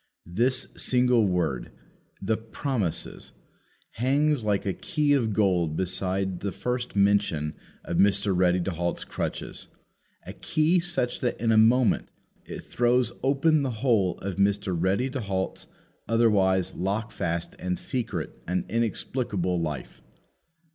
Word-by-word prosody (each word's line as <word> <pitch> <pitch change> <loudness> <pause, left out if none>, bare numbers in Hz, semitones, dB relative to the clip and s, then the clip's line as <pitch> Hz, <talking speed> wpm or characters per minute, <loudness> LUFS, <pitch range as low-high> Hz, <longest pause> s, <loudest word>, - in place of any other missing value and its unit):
This 120 +9 0
single 125 -3 +3
word, 80 -9 -1 0.5
the 110 +3 0
"promises," 115 - -3 0.6
hangs 140 +2 +1
like 105 -1 0
a 95 - 0
key 150 - 0
of 120 -6 +2
gold 90 -7 +1
beside 95 0 -1
the 100 - -3
first 125 +1 -3
mention 100 -7 +2 0.3
of 85 - -3
Mr. 100 +1 +3
Ready 90 0 +3
to 95 - -2
halt's 85 +1 -2
crutches - - -5 0.6
a - - -7
key 160 +4 +1
such 170 -8 -1
that 125 - -2
in 115 0 +1
a - - +4
moment 115 +3 +4 0.4
it - - -7
throws 120 0 +1
open 145 +3 +3
the 135 - -1
whole 110 -6 +1
of 95 -1 -4
Mr. 100 -2 +1
Ready 95 +9 +1
to 135 - -3
halt's 95 -2 -3 0.4
otherwise 100 -5 +2
lockfast 95 -4 -2
and 90 0 -2
secret 115 - -4
and 90 +1 -1
inexplicable 105 -5 -1
life. 75 -4 -5
100 Hz, 130 wpm, -26 LUFS, 90-125 Hz, 0.6 s, a